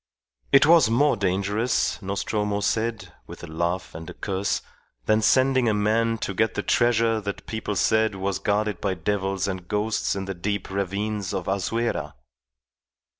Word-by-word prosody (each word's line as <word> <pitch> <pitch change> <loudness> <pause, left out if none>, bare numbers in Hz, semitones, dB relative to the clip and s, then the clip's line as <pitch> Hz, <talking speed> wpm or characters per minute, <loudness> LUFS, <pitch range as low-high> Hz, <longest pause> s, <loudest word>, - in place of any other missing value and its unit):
It 135 - +7
was 165 -7 +6
more 140 +5 +3
dangerous, 100 +5 0
Nostromo 100 +1 -2
said, 110 +1 -1
with - - -11
a - - -8
laugh 85 +3 -2
and 80 +1 -8
a - - -9
curse, 100 0 -2 0.4
than 110 +6 +3
sending 130 +1 +3
a 105 - +1
man 115 +2 +1
to 100 - -4
get 110 +3 0
the - - -2
treasure 115 -2 +2
that 100 -1 -5
people 110 -2 -4
said 110 0 +2
was 95 0 -2
guarded 105 -2 -1
by 95 -2 0
devils 95 +2 -1
and 95 -2 -5
ghosts 105 +1 -1
in 95 0 -3
the 95 - -4
deep 100 +2 -3
ravines 100 +1 -2
of 90 - -4
Azuera. 115 +5 -1
105 Hz, 160 wpm, -24 LUFS, 95-110 Hz, 0.4 s, It